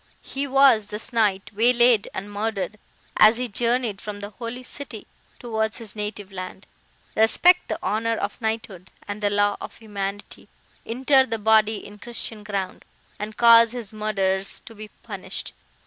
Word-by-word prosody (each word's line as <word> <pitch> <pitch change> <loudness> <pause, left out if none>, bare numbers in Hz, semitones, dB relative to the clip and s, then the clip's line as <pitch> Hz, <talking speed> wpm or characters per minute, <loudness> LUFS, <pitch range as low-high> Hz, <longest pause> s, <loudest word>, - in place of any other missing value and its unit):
He 275 +1 -4
was, 265 -6 +5
this 215 +4 -7
night, 205 -4 +1
waylaid 235 0 +4
and 205 +2 -6
murdered, 215 0 -3 0.4
as 215 +2 +7
he 250 0 -2
journeyed 235 -1 0
from 210 -1 -6
the 205 +1 -7
Holy 240 +4 -7
City 255 -4 -8 0.3
towards 220 -2 -2
his 225 -4 -10
native 210 -1 -5
land. 185 +1 -7 0.5
Respect 225 +11 +5
the - - -2
honour 225 +2 0
of 205 +3 -4
knighthood 220 -5 -4 0.2
and 205 +1 -5
the 205 - +2
law 205 0 +2
of - - -8
humanity; 205 -2 -6 0.4
inter 265 +3 +3
the 225 - -2
body 220 0 +3
in 205 0 -12
christian 230 -2 -5
ground, 200 -3 -4 0.4
and 210 +1 -6
cause 230 -1 +7
his 230 -4 -6
murderers 195 -3 -1
to 225 - -12
be 215 0 -9 0.2
punished. - - -5
215 Hz, 155 wpm, -24 LUFS, 205-230 Hz, 0.5 s, as